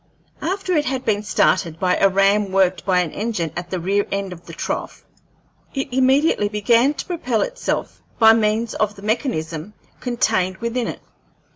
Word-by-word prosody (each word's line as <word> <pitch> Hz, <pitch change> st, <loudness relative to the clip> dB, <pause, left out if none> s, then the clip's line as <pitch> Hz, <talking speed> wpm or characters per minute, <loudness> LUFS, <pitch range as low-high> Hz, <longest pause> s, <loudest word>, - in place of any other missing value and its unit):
After 375 Hz, +2 st, -2 dB
it 300 Hz, -1 st, +2 dB
had 260 Hz, 0 st, -2 dB
been 205 Hz, -2 st, +1 dB
started 175 Hz, -5 st, +1 dB
by 180 Hz, -1 st, +2 dB
a 195 Hz, -, +4 dB
ram 195 Hz, +1 st, +2 dB
worked 190 Hz, -2 st, +1 dB
by 180 Hz, -1 st, +4 dB
an 170 Hz, -4 st, -3 dB
engine 205 Hz, -7 st, -2 dB
at 175 Hz, 0 st, -5 dB
the 185 Hz, -, -2 dB
rear 200 Hz, +4 st, 0 dB
end 195 Hz, -2 st, -2 dB
of 175 Hz, 0 st, -15 dB
the -, -, -8 dB
trough, -, -, -4 dB, 0.7 s
it 270 Hz, -1 st, -3 dB
immediately 265 Hz, -3 st, +3 dB
bean 230 Hz, +7 st, +3 dB
to -, -, -5 dB
propel 255 Hz, -, -1 dB
itself -, -, -3 dB, 0.2 s
by 225 Hz, -1 st, +7 dB
means 225 Hz, +1 st, +1 dB
of 210 Hz, -1 st, -1 dB
the 200 Hz, -, -13 dB
mechanism 205 Hz, -, -2 dB, 0.2 s
contained 185 Hz, -7 st, 0 dB
within 235 Hz, +2 st, -2 dB
it. -, -, -6 dB
210 Hz, 170 wpm, -21 LUFS, 185-245 Hz, 0.7 s, by